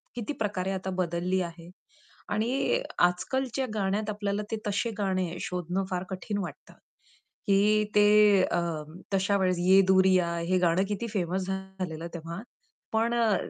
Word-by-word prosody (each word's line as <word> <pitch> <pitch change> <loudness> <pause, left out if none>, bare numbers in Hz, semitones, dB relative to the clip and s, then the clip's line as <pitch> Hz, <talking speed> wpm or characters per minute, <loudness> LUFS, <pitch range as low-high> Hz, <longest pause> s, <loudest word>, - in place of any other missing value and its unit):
किती 240 +4 -3
प्रकारे 195 -3 -1
आता 190 0 -3
बदलली 180 +1 0
आहे 170 -1 -7 0.6
आणि 250 - +1 0.2
आजकालच्या 260 +9 +1
गाण्यात 205 +1 0
आपल्याला 205 0 -2
ते 225 - 0
तसे 205 +3 0
गाणे 185 -3 -1
शोधणं 180 +2 -2
फार 180 0 -1
कठीण 190 +2 -4
वाटतं, - - -8 0.7
की 210 +2 +4
ते 210 -1 +6
अ, 175 - +1 0.5
तशा 200 +1 +2
वेळेस 185 -2 +1
"ये 190 +2 +6
दूरियाँ" 185 -2 +4
हे 185 +2 +1
गाणं 175 +1 +3
किती 210 +3 -2
फेमस 185 0 -1
झालेलं 190 -4 -5
तेव्हा. 170 +1 -6 0.5
पण 230 +2 +2
अ, 225 -3 +3
190 Hz, 140 wpm, -28 LUFS, 180-210 Hz, 0.7 s, ते